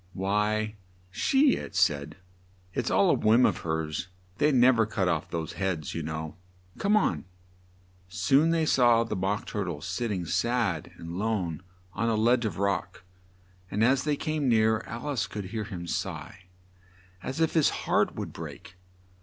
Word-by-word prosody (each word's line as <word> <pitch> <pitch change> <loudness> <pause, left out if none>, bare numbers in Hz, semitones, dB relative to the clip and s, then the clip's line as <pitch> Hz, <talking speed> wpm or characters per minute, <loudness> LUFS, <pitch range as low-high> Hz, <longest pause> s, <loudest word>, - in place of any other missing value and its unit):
"Why, 105 +3 0 0.3
she," 270 - +3
it - - -8
said. 75 -4 +1 0.6
"It's - - -1
all - - +4
a - - +4
whim 115 +4 +4
of - - +2
hers; 80 +1 -3 0.3
they 150 +1 +4
nev 125 -2 +5
er 110 - +5
cut 100 -4 -1
off 85 -3 -1
those 80 -2 -4
heads, 95 -6 -2
you 80 - -3
know. 80 +1 -5 0.4
Come 205 +2 +3
on." 85 - 0 0.8
Soon 140 - +3
they 165 -1 +2
saw 120 -5 +4
the 115 -2 -4
Mock 95 +2 -1
Tur 105 - -3
tle 85 -5 -4
sitting 95 +2 -3
sad 110 -3 0
and 85 +2 -6
lone 100 -7 -1 0.3
on 115 +1 0
a 115 - +2
ledge 120 +2 +3
of 100 -6 -3
rock, 100 -2 -2 0.7
and 105 +2 0
as 130 +3 +3
they 150 -1 +1
came 155 -2 -1
near, 110 -1 +3
Al 120 +5 -6
ice 140 -4 -1
could 105 -3 -6
hear 110 -2 -2
him 90 -5 -6
sigh 90 +1 -5 0.8
as 130 +8 -5
if 160 -1 +2
his 160 -3 +4 0.2
heart - - +2
would - - -5
break. 90 - -9
105 Hz, 170 wpm, -28 LUFS, 90-120 Hz, 0.8 s, nev